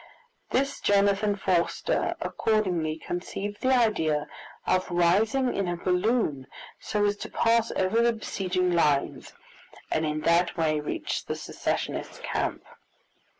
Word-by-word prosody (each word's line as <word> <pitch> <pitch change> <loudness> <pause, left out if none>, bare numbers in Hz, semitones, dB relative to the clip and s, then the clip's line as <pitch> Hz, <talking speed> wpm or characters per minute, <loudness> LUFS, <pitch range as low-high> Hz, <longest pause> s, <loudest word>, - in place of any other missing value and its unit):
Thus 275 +2 0
Jonathan 200 0 +2
Forster 185 -3 0
accordingly 180 -8 0
conceived 195 +5 -5
the 260 - +2
idea 160 -11 +2 0.4
of 185 0 +1
rising 210 +9 +2
in 195 -2 -1
a 175 - -1
balloon, 180 - 0 0.3
so 210 -1 0
as 205 0 +1
to - - -7
pass 230 0 +2
over 190 +5 +2
the 235 0 +3
besieging 185 -4 -1
lines, 150 -5 +1 0.6
and 155 - +1
in 155 0 -1
that 170 +2 +2
way 155 -2 +1
reach 150 - -3
the - - -2
Secessionist - - -4
camp. - - -2
185 Hz, 125 wpm, -27 LUFS, 170-215 Hz, 0.6 s, the